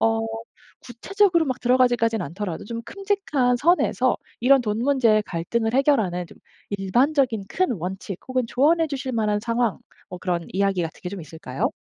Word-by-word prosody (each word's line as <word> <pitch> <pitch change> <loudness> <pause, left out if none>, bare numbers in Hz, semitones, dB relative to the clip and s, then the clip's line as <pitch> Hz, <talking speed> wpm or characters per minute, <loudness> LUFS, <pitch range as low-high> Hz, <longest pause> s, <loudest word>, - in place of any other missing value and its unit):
어 225 0 +2 0.6
구체적으로 345 - +1
막 260 -1 -2
들어가기까진 240 -3 +2
않더라도 175 +2 -5
좀 230 +1 -5
큼직한 385 - 0
선에서 345 +8 +2 0.2
이런 270 +2 +5
돈 210 -1 -2
문제의 235 -5 +3
갈등을 225 +7 -2
해결하는 215 - +2
좀 - - -17 0.3
일반적인 235 +3 +1
큰 370 -6 0
원칙 190 0 -5
혹은 255 -1 0
조언해 320 +7 +3
주실 270 -3 -4
만한 210 -2 0
상황. 230 -1 0 0.3
뭐 180 - -7
그런 175 -2 -2
이야기 195 -2 +1
같은 165 - -6
게 180 - -4
좀 200 -3 -6
있을까요? 155 -4 -4
230 Hz, 355 characters per minute, -23 LUFS, 195-265 Hz, 0.6 s, 이런